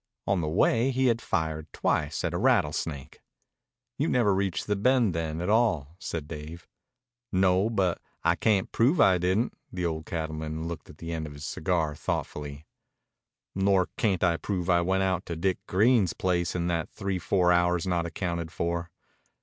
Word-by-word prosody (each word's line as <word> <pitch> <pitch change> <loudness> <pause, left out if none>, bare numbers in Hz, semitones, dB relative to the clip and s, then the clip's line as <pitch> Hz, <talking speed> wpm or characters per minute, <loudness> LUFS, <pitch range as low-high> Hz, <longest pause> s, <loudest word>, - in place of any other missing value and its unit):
On 95 -3 +1
the 80 - -2
way 115 +9 +3
he 130 0 +1
had 115 -2 +2
fired 80 -2 -2
twice 75 0 -1
at 85 -1 -1
a - - 0
rattlesnake. 80 - 0 0.8
"You 150 - +2
never 115 -9 +3
reached 95 -4 -1
the 105 - 0
Bend, 120 -1 +3
then, 80 -1 -2
at 90 - -2
all," 100 - +2
said 80 -5 -4
Dave. 80 +1 -8 0.6
"No, 95 +2 +3
but 95 -6 0 0.2
I - - +3
cayn't 105 -4 +1
prove 135 +9 +3
I 95 -9 +5
didn't." 95 +7 +1 0.2
The 90 -1 -3
old 80 -1 -3
cattleman 80 0 -4
looked 85 -1 -7
at 75 - -13
the 85 0 -6
end 80 -2 -3
of 75 - -9
his 70 +1 -8
cigar 80 -2 -1
thoughtfully. 75 0 -4 0.9
"Nor 95 -1 +2
I - - -8
cayn't 90 -5 +2
prove 95 -3 -1
I 85 0 +4
went 95 +2 +1
out 95 -1 0
to 85 - -3
Dick 90 +3 0
Grein's 105 -1 +3
place 90 -2 0
in 85 -1 -1
that 85 -2 -1
three 100 -3 -3
four 90 0 +2
hours 90 0 +2
not 85 -2 0
accounted 85 -1 -3
for." 85 0 -2
90 Hz, 175 wpm, -27 LUFS, 80-100 Hz, 0.9 s, I